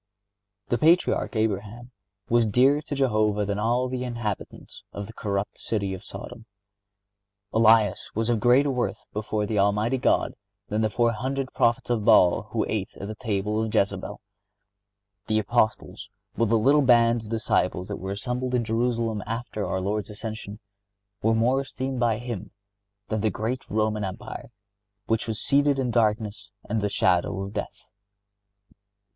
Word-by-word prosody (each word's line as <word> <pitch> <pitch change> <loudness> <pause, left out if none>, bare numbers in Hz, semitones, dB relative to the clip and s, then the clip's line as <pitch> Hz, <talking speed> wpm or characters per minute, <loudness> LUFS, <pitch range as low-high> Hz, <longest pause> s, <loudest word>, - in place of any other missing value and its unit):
The 120 - +1
Patriarch 165 -4 +3
Abraham 110 +3 -2 0.4
was 120 -1 +3
dearer 130 +7 +4
to 150 -1 -5
Jehovah 110 -6 +1
than 100 0 -2
all 120 +4 +1
the 125 0 -3
inhabitants 120 -5 -5
of 100 - -6
the 110 - -11
corrupt 100 -2 -3
city 100 -4 -2
of 95 - -8
Sodom. 115 - -9 1.1
Elias 110 -2 +4
was 110 +1 0
of 120 -2 +2
greater 125 +5 +4
worth 125 -2 -1 0.2
before 105 0 -2
the 105 0 -1
Almighty 105 +6 +2 0.7
than 105 +1 0
the 110 - +2
four 120 +2 +2
hundred 130 +3 -3
prophets 120 +1 +1
of 115 -3 0
Baal 105 -2 +5
who 110 0 0
ate 105 -3 -3
at 100 - -6
the - - -3
table 105 -1 -1
of 110 - -1
Jezabel. 100 - -1 1.1
The 110 - +1
Apostles 110 0 0 0.3
with 115 -2 +1
the 115 - +4
little 140 +7 +4
band 120 -2 +4
of 110 - -11
disciples 95 -5 0
that 100 - -3
were 95 - -6
assembled 125 +4 -2
in 120 - +1
Jerusalem 115 -1 0
after 115 -2 -3
our 95 - -1
Lord's 105 +3 -2
ascension, 105 -1 -6 0.6
were 110 +1 +2
more 125 +4 +2
esteemed 130 -1 -4
by 115 -3 +2
Him 115 -5 -6 0.6
than 110 -1 -1
the 110 - +2
great 115 +6 -4
Roman 110 0 0
Empire, 95 -2 -6 0.6
which 115 +1 0
was 110 -2 -2
seated 140 0 +3
in 130 -2 0
darkness 105 -3 0 0.2
and 110 0 -1
the 105 - 0
shadow 95 +1 +1
of 100 +1 -6
death. 105 - -5
110 Hz, 155 wpm, -25 LUFS, 105-120 Hz, 1.1 s, Baal